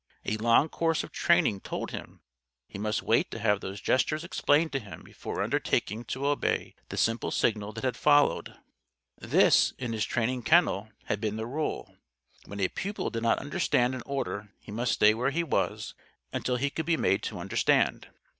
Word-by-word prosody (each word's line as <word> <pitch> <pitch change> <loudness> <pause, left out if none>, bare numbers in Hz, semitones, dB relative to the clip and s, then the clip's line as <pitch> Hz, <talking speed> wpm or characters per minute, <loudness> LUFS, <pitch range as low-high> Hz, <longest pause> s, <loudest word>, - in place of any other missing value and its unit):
A 110 - 0
long 115 +6 +4
course 165 0 0
of - - -9
training 100 - +2
told - - -5
him - - -8 0.5
he 100 - -9
must 105 +1 -1
wait - - +2
to - - -6
have 105 -1 +1
these 95 +2 -6
gestures 150 +9 +1
explained 160 -1 +2
to 135 - -1
him 105 -5 -11
before - - -5
undertaking 110 +4 -1
to 130 +4 -4
obey 145 0 0 0.2
the - - -6
simple 115 +1 +1
signal 105 -2 0
that 115 - -7
had 130 -2 0
followed. 145 +1 +3 0.6
This, - - +4
in 120 -3 -4
his 110 -1 -1
training 125 +3 -1
kennel, 115 - +3 0.2
had 100 - -2
been 105 -2 -1
the 110 - -3
rule. 150 +6 -4 0.5
When 100 - -8
a 95 - +3
pupil 200 +2 -4
did 115 - -3
not 115 0 +2
understand 125 -3 +1
an 130 - -5
order 105 -7 -3
he - - -12
must 120 +3 0
stay 105 +1 +5
where 125 +4 0
he 165 +5 0
was 165 - -1 0.4
until 125 - -1
he 140 +3 -1
could 160 +1 -4
be 165 -1 +2
made 95 - +2
to - - -5
understand. - - +1
120 Hz, 185 wpm, -28 LUFS, 110-145 Hz, 0.6 s, stay